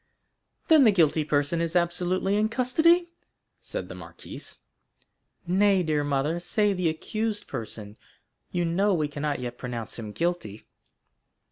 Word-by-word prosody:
"Then 315 -3 +7
the 225 - +6
guilty 160 -4 +3
person 150 +2 0
is 170 +1 -2
absolutely 180 +3 +1
in 215 +1 +2
custody?" 320 +9 +3 0.5
said - - -5
the - - -8
marquise. - - -10 0.9
"Nay, 190 +1 +3
dear 155 -2 0
mother, 145 +4 0
say 210 +3 +2
the 180 -3 0
accused 210 +6 -3
person. 105 -2 -7 0.5
You 175 -1 -1
know 190 +4 +2
we 155 -3 0
cannot 145 -1 -3
yet 120 -1 -6
pronounce 120 -2 -5
him 110 -2 -6
guilty." 165 - -3
175 Hz, 135 wpm, -26 LUFS, 145-205 Hz, 0.9 s, Then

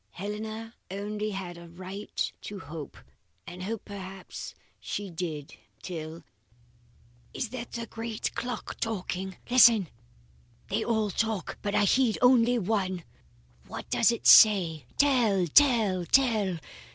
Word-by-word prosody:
Helena 215 +3 -6 0.2
only 210 +2 -3
had 185 -4 -6
a 170 0 -12
right 185 +4 -5
to 205 - -7
hope, 155 -2 -8 0.5
and 180 +1 -9
hope 215 +3 -4
perhaps 195 -2 -8 0.2
she 205 -2 -5
did, 160 -4 -5 0.3
till 160 -2 -6 1.1
Is 235 - -2
that 245 -1 -7
the 235 0 -4
great 225 -1 -4
clock 245 -2 -5
talking? 190 -4 -3
Listen! 235 -7 +6 0.8
They 215 +3 0
all 220 -3 0
talk, 220 -4 -2
but 205 0 -2
I - - +4
heed 240 +2 +3
only 245 -1 +5
the 225 - -2
one. 185 -3 -1 0.6
What - - -8
does 230 - +4
it 235 - -5
say? 175 - +7
Tell! 235 -10 +3
tell! 215 - +4
tell! 220 -9 +3
205 Hz, 130 wpm, -28 LUFS, 185-225 Hz, 1.1 s, say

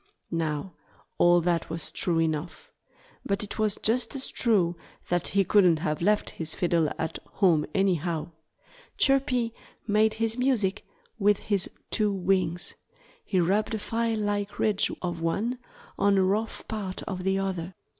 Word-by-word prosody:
Now, 165 +2 -2 0.5
all 175 0 +6
that 170 -1 0
was 165 -1 -4
true 170 -2 +1
enough. 165 - -2 0.5
But 200 +1 -1
it 210 - -6
was 215 -2 +1
just 235 +3 +1
as 270 - -3
true 190 -8 +2 0.3
that 175 -1 0
he 200 0 +2
couldn't 185 -4 +4
have 155 -1 -2
left 210 +4 +2
his 160 -1 -4
fiddle 170 -3 +2
at 160 - -3
home 170 -7 +3
anyhow. 175 -4 0 0.7
Chirpy 260 -4 +2 0.3
made 215 0 +3
his 225 +1 -1
music 235 -7 +1 0.3
with 205 0 +4
his 200 -3 0 0.2
two 210 -2 +2
wings. 185 -2 0 0.5
He 190 - 0
rubbed 200 +6 +1
a - - -1
file 230 +1 -1
like 205 -1 -2
ridge 210 -2 +2
of 175 -2 -3
one 220 +9 -1 0.4
on 200 -1 +4
a 190 - +4
rough 210 +4 -1
part 200 -4 -4
of 185 -2 -5
the 190 +1 +1
other. 190 -2 -3
195 Hz, 150 wpm, -27 LUFS, 175-215 Hz, 0.7 s, all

